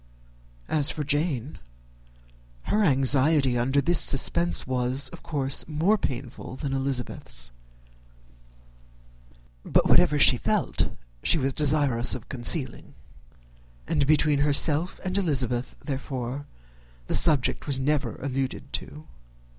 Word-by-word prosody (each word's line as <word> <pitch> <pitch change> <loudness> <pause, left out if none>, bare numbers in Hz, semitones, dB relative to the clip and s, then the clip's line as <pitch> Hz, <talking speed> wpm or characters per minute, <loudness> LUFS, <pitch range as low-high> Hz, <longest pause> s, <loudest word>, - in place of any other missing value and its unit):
As 150 -3 0
for 150 - -3
Jane, 145 -2 -2 1.0
her 210 +1 0
anxiety 135 -2 +3
under 130 +4 +1
this 170 +4 +2
suspense 170 +5 +3
was, 130 +1 +1
of - - -13
course, 140 -3 -2
more 165 +7 +1
painful 130 - -6
than 135 0 -5
Elizabeth's: 135 - -3 2.1
but - - +1
whatever - - +4
she - - +5
felt - - -1 0.3
she - - +2
was 135 -2 -1
desirous 140 -6 +2
of 125 - -10
concealing; 130 +1 -1 0.9
and 135 - 0
between 150 -1 +2
herself 150 +4 +2
and 185 -1 -4
Elizabeth, 130 -8 -1
therefore, 135 -1 -5 0.6
the - - -4
subject 150 -4 +4
was 135 -2 -1
never 135 -3 -1
alluded 135 -1 -4
to. 75 - -7
140 Hz, 110 wpm, -25 LUFS, 130-150 Hz, 2.1 s, she